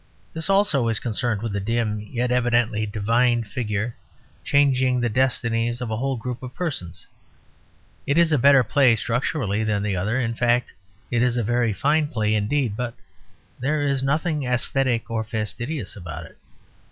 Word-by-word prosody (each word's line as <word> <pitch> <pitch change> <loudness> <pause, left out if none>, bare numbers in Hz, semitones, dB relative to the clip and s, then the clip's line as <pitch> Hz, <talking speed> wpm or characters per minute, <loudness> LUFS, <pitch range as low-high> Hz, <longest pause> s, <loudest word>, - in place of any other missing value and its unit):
This 160 +3 -3
also 195 - +3
is 115 -2 0
concerned 115 -2 -2
with 110 -3 -3
a - - 0
dim, 110 +1 -1
yet 120 +4 -2
evidently 120 -3 +1
divine, 115 +3 +1
figure 105 +1 -3 0.5
changing 130 -3 +3
the 120 -1 0
destinies 120 -1 0
of 125 -3 -4
a 110 - -1
whole 135 +2 -1
group 125 +1 -5
of 130 -1 -8
persons. 95 - -4 1.0
It 140 +2 +1
is 170 -1 +4
a 150 - +3
better 140 +1 +6
play 120 +1 +4
structurally 115 -1 -1
than 105 -2 0
the 100 -2 -1
other; 105 +8 0
in 115 -2 -1
fact, 120 +1 +1 0.4
it 120 -1 +1
is 125 0 +2
a 120 - +1
very 120 +1 +1
fine 150 +9 +2
play 110 -6 0
indeed; 110 +2 0
but 120 0 -4 0.6
there 145 +3 0
is 140 -2 0
nothing 150 +2 0
aesthetic 125 -1 0
or 110 -1 -1
fastidious 120 +7 -4
about 85 -4 -7
it. - - -17
120 Hz, 165 wpm, -23 LUFS, 110-130 Hz, 1.0 s, better